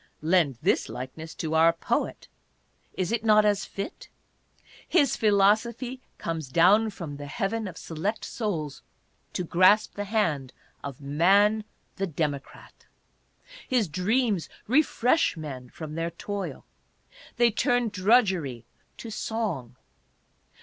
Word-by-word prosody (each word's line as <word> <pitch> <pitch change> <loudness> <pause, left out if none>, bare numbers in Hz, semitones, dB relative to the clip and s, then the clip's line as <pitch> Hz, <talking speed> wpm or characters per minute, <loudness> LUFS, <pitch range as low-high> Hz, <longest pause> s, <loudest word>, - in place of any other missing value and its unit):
Lend 160 -6 +3
this - - +2
like 125 +3 -6
ness 160 +1 -9
to 160 -1 -3
our 165 +1 +6
poet; 165 - -2 0.7
is 185 0 -1
it 230 -1 0
not 215 -1 +5
as 205 -1 +2
fit? 200 - -7 0.8
His 290 -8 +3
philosophy 225 +5 +2 0.2
comes 165 -3 -4
down 195 +9 +5
from 170 -8 -7
the 145 0 -7
heaven 205 +8 -2
of 180 - -8
select 185 +7 -3
souls 160 - -3 0.5
to 180 - -2
grasp 185 +5 +4
the 205 - -4
hand 165 - 0 0.3
of 140 -1 -7
Man 200 +9 +3 0.3
the 195 0 -1
Democrat. 145 -4 -5 0.8
His 245 -6 +2
dreams 195 - 0 0.2
refresh 265 - +2
men 135 -5 -7
from 155 +2 -8
their 165 +1 -2
toil. 200 +4 -6 0.7
They 240 -1 +4
turn 245 +2 +1
drudgery 185 - +2 0.3
to 230 - -8
song. 200 - -3
190 Hz, 120 wpm, -27 LUFS, 155-220 Hz, 0.8 s, our